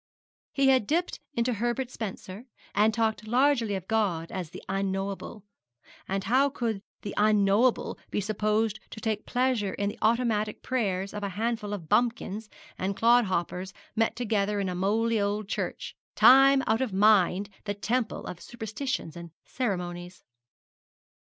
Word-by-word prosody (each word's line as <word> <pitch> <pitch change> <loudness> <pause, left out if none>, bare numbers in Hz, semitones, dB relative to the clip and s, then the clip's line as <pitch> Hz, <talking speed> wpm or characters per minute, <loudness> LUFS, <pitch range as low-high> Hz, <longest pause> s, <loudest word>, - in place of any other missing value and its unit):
He 275 -1 +3
had 260 -6 +3
dipped 345 +3 0 0.2
into 235 +1 +1
Herbert 240 +3 -2
Spencer, 210 +1 -7 0.3
and 210 +2 +4
talked 220 -1 -1
largely 240 -3 +2
of 190 -1 -6
God 195 -7 0
as 180 -4 -4
the - - -10
Unknowable; 195 +1 -3 0.6
and 195 0 -2
how 265 +6 +3
could 230 -6 -2 0.2
the 200 - -5
Unknowable 210 +3 +3
be - - -1
supposed 215 +1 0
to - - -9
take 220 -1 -2
pleasure 245 -6 0
in 200 0 -1
the - - -9
automatic 220 -2 +1
prayers 200 -7 -1
of 210 - -5
a 200 - -2
handful 215 +1 -2
of 190 -6 -5
bumpkins 225 -1 0 0.3
and 195 +1 -2
clodhoppers 190 -6 +2 0.2
met 225 0 +1
together 210 -3 0
in 195 -2 -1
a - - -2
mouldy 215 +4 +1
old 205 0 -1
church, - - -4 0.2
time 270 +1 +7
out 220 +2 +1
of 260 -5 -1
mind 200 -1 +4 0.2
the 205 -1 -2
temple 225 +3 -2
of 175 - -7
superstitions 235 - -4
and 170 0 -8 0.2
ceremonies. 180 -6 -4
215 Hz, 145 wpm, -28 LUFS, 195-235 Hz, 0.6 s, time